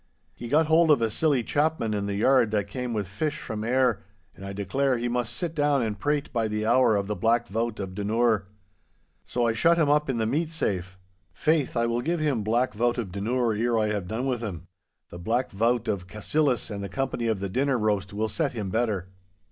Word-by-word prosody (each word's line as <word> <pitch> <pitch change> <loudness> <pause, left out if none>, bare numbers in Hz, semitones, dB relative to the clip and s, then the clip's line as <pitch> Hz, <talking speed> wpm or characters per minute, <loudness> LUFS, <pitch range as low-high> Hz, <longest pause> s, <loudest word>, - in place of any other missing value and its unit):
He 120 - -8
got 155 +6 +3
hold 160 +1 +4
of 150 - +6
a 115 -1 0
silly 140 0 +2
chapman 145 -5 0
in 100 -1 -2
the 100 - -2
yard 120 +2 +4
that 105 -2 -1
came 125 +4 -4
with 105 -4 -2
fish 145 - -2
from 110 -1 -5
Ayr, 125 -2 +2 0.3
and 95 - -12
I 100 - -5
declare 125 +7 0
he 120 +1 -2
must 120 -1 -1
sit 170 -3 -3
down 145 -4 +2
and 105 -3 -3
prate 145 +4 -1
by 115 -2 +1
the 105 0 -2
hour 120 -1 +4
of 100 -1 0
the 105 +1 -3
Black 115 +2 +1
Vaut 115 +2 -2
of 95 -2 -5
Dunure. 105 0 +1 0.8
So 120 -1 -1
I 115 - +2
shut 165 +10 +3
him 155 -4 +3
up 150 -1 +2
in 130 - 0
the 110 - 0
meat 155 +8 0
safe. 95 - -3 0.4
Faith, 155 -5 +1
I 115 - +2
will 120 +1 0
give 170 +6 -1
him 145 -7 0
Black 115 +4 +1
Vaut 120 +3 +1
of 110 -7 -3
Dunure 115 +4 0
ere 115 +2 +1
I 110 -1 +1
have 100 -4 -2
done 115 +6 -3
with 125 -3 -1
him. 90 -7 -5 0.5
The 85 - -8
Black 115 +8 -1
Vaut 115 +3 +1
of 95 -3 -2
Cassillis 125 +4 0
and 100 -1 -4
the 100 - -5
company 130 -3 -2
of 110 -3 0
the 100 - -2
dinner 130 +6 +1
roast 105 -3 0
will 105 +2 -1
set 145 +3 -1
him 105 -5 -4
better. 105 -5 -1
115 Hz, 230 wpm, -26 LUFS, 105-130 Hz, 0.8 s, of